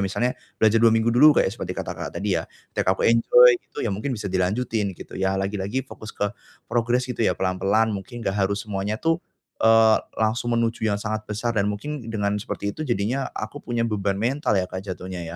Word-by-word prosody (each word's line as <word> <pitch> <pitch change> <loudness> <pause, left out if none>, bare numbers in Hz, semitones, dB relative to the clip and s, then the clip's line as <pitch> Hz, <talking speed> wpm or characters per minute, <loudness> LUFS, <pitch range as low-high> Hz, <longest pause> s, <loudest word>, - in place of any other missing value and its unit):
misalnya, 100 +6 0 0.2
belajar 110 +1 +4
2 115 - +7
minggu 115 +1 +2
dulu 150 +5 +7
kayak 95 - +3
seperti 120 - -5
kata - - -3
Kakak - - -6
tadi 100 +4 -2
ya. - - -5 0.3
Tiap - - -1
aku - - -1
enjoy 120 +2 +7
gitu - - -7
ya, 105 - 0
mungkin 120 +5 -3
bisa 105 - -5
dilanjutin 100 +1 0
gitu - - -11
ya. 95 0 0
Lagi-lagi 100 +6 -2
fokus 110 - -10
ke 105 +2 -1 0.3
progres 120 +2 +1
gitu 125 -2 -5
ya, 110 - +2
pelan-pelan 100 +4 +1
mungkin 115 +4 -6
enggak 95 0 +1
harus 100 +1 -3
semuanya 105 +1 -2
tuh, 165 +5 0 0.4
eee, 110 0 +6 0.2
langsung 115 +2 0
menuju 115 -1 0
yang 100 - +1
sangat 110 +1 -3
besar 110 +3 -2
dan 100 -2 +1
mungkin 140 +9 -4
dengan 100 -2 -1
seperti 100 0 -4
itu, - - -11
jadinya 120 +4 0
aku 145 - -5
punya 120 -1 -1
beban 100 -3 -1
mental 120 0 0
ya, 95 - +2
Kak, 95 +1 -6
jatuhnya 95 -1 -6
110 Hz, 205 wpm, -24 LUFS, 100-120 Hz, 0.4 s, 2